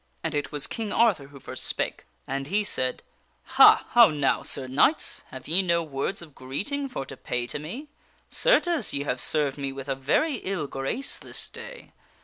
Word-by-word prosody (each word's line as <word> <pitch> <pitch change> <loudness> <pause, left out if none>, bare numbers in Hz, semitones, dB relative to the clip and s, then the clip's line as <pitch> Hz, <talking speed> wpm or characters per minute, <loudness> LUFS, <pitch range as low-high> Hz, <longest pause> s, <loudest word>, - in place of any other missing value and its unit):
And 160 - -2
it 145 -1 -2
was 145 -1 -3
King 220 -2 -4
Arthur 200 -12 +3
who 140 0 -13
first - - -7
spake. - - -3 0.2
And 135 0 -3
he 205 +6 +1
said: 130 -10 -1 0.2
" - - -41
Ha! - - +8
how 235 -2 +8
now, 145 -3 +1
Sir 135 - 0
Knights? 145 - +2
Have 130 - -10
ye 170 +5 +4
no 170 -2 +1
words 145 +4 -3
of 155 -4 -14
greeting 205 - -4
for 190 - -5
to 135 - -9
pay 125 -1 -3
to 125 - -5
me? 230 - -7 0.4
Certes, 350 - +2
ye 140 - 0
have 125 -3 -2
served 145 -2 +1
me 140 -1 -2
with 135 0 -8
a 135 - 0
very 150 - +1
ill 190 -7 -3
grace 135 - -3
this - - -7
day. - - -10
150 Hz, 195 wpm, -26 LUFS, 135-215 Hz, 0.4 s, Ha